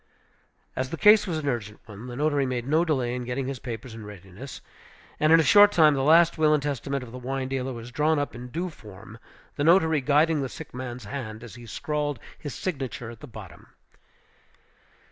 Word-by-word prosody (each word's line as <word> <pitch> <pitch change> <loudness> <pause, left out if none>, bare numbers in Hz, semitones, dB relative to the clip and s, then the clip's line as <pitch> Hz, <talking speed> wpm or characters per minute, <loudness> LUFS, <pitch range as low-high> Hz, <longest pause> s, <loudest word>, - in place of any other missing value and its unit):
As 130 0 -2
the 165 - -5
case 210 +2 +6
was 170 -3 -1
an 150 -2 -4
urgent 110 -5 -3
one, 105 +3 -10
the 120 - -7
notary 145 -1 +1
made 125 -1 -3
no 155 +4 +3
delay 130 -7 0
in 125 0 -3
getting 125 +2 -3
his 135 -1 -4
papers 120 -1 -7
in 110 -1 -9
readiness; 100 +5 -10 0.6
and 155 +1 +3
in 165 - +8
a - - +4
short 205 +4 +7
time 155 -5 +5
the 135 - 0
last 165 +3 +5
will 155 -1 +5
and 145 - -2
testament 140 -1 -2
of 120 - -10
the 125 - -8
wine 130 +1 -3
dealer 130 0 -3
was 120 0 -8
drawn 150 +4 +2
up 145 0 -2
in 120 +1 -8
due 170 +7 -4
form, 110 -3 -13 0.4
the 145 - 0
notary 160 -2 +4
guiding 150 +3 +3
the 135 - -3
sick 160 - -10
man's 125 -2 -6
hand 110 -1 -6
as 120 - -10
he 120 -1 -12
scrawled 150 +2 -2 0.2
his 145 - -6
signature 135 -8 -4
at 115 - -13
the 145 - -10
bottom. 105 - -12
135 Hz, 210 wpm, -26 LUFS, 120-155 Hz, 0.6 s, in